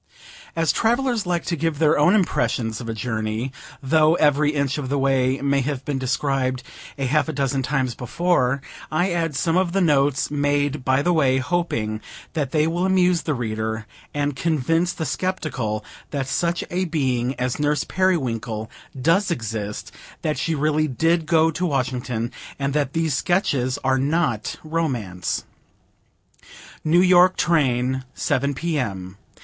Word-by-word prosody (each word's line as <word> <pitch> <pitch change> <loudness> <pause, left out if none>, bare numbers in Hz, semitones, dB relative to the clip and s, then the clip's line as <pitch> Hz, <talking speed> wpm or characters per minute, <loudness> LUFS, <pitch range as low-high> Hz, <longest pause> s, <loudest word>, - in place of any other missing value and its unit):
As 165 -3 +2
travellers 235 - +1
like 175 -1 0
to 170 - -1
give 165 -1 -1
their 155 0 +4
own 150 +7 +4
impressions 120 - 0
of 115 - -6
a - - -1
journey, 110 +2 -2 0.3
though 155 +3 +4
every 150 -2 +3
inch 140 -1 0
of 130 -3 -4
the 140 - 0
way 135 -1 +2
may 140 0 +2
have 135 -1 -3
been 140 -2 -1
described 130 -1 -1 0.3
a 135 - -1
half 150 +4 +1
a - - -2
dozen 135 -1 0
times 130 -2 0
before, 130 +1 0 0.3
I 175 +4 +1
add 165 -3 -1
some 165 +4 +1
of 185 -2 +1
the 195 - +2
notes 145 -6 +2
made 145 -1 0
by 130 +2 +2
the 175 - +2
way, 135 -5 +3
hoping 130 -8 -1 0.3
that 150 -5 -1
they 155 +2 +2
will 170 +2 0
amuse 180 -2 +3
the 150 - -1
reader, 110 -2 -3 0.3
and 145 -1 -1
convince 165 +4 +1
the 160 - -4
skeptical 135 - -2 0.2
that 140 -2 -2
such 170 +4 0
a 185 +1 0
being 130 -6 0
as 125 +1 -2
Nurse 150 -1 +1
Periwinkle 120 - -1 0.3
does 170 +9 +3
exist, 110 - -4 0.3
that 155 -1 -1
she 165 - 0
really 155 +1 +1
did 165 +4 +1
go 160 0 +4
to 170 - -4
Washington, 125 -6 -1 0.3
and 140 0 -1
that 145 -2 0
these 165 -2 0
Sketches 140 -6 +1
are 130 0 +2
not 140 -6 0
romance. 125 - -2 1.4
New 165 +3 +4
York 180 0 +6
Train 130 -5 +1
Seven 140 -1 0
P. 165 +1 -1
M. 95 -5 -4
145 Hz, 155 wpm, -23 LUFS, 125-165 Hz, 1.4 s, York